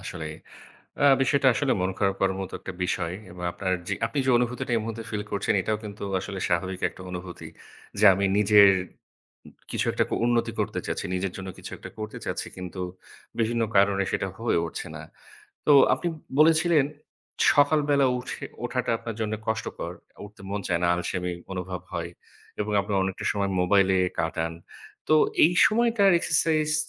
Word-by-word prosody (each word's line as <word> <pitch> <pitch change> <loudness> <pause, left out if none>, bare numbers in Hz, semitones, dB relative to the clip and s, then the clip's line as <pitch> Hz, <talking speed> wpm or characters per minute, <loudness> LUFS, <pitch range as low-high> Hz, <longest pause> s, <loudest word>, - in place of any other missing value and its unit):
আসলে 80 - -6 0.8
আ - - +3 0.2
বিষয়টা 140 +1 +3
আসলে 130 +4 0
মন 95 - +1
খারাপ 100 -1 +1
করার 95 -1 +2
মতো 95 - -7
একটা 95 - -7
বিষয় 85 -1 -1 0.2
এবং 90 0 -9
আপনার 95 +1 -2
যে 100 - 0
আপনি 115 +5 -2
যে - - +2
অনুভূতিটা 125 0 -2
এই - - +2
মুহূর্তে 115 0 -5
feel 105 -1 -2
করছেন 100 - 0
এটাও 105 +3 -1
কিন্তু 105 -1 -8 0.2
আসলে 95 +1 -6
স্বাভাবিক 90 +2 -1
একটা - - -14
অনুভূতি। 90 0 -7 0.5
যে - - +1
আমি 100 +2 0
নিজের 105 -1 +7 1.0
কিছু - - -1
একটা - - +1 0.2
উন্নতি 120 -1 +1
করতে - - -2
চাচ্ছি, - - -3
নিজের 95 0 -2
জন্য 95 0 -7
কিছু - - -9
একটা - - -9
করতে 110 0 -6
চাচ্ছি - - -3
কিন্তু 90 0 -7 0.6
বিভিন্ন 115 0 +1
কারণে 100 0 +4
সেটা 100 - -1
হয়ে 115 -5 +1
উঠছে 85 - -6
না। - - -8 0.6
তো 150 - +6 0.2
আপনি 175 - -3 0.3
বলেছিলেন 160 -1 +5 0.7
সকালবেলা 145 -1 +3
উঠে 125 - -7 0.2
ওঠাটা - - -1
আপনার 115 -1 -6
জন্য 110 -1 -1
কষ্টকর। 110 -2 -3 0.3
উঠতে 105 -1 -18
মন 100 0 -2
চায় 85 -1 +1
না, - - +3
আলসেমি 90 0 -3 0.2
অনুভব 90 -1 -4
হয় - - -3 0.5
এবং 105 0 -2
আপনি 100 +1 -5
অনেকটা 95 -1 -3
সময় 100 -1 -1
মোবাইলে 95 +1 +3 0.2
কাটান। 80 0 -2 0.6
তো 155 - +5 0.3
এই 165 - +4
সময়টার 225 -2 +3
exercise 155 -1 +2
105 Hz, 165 wpm, -26 LUFS, 95-125 Hz, 1.0 s, নিজের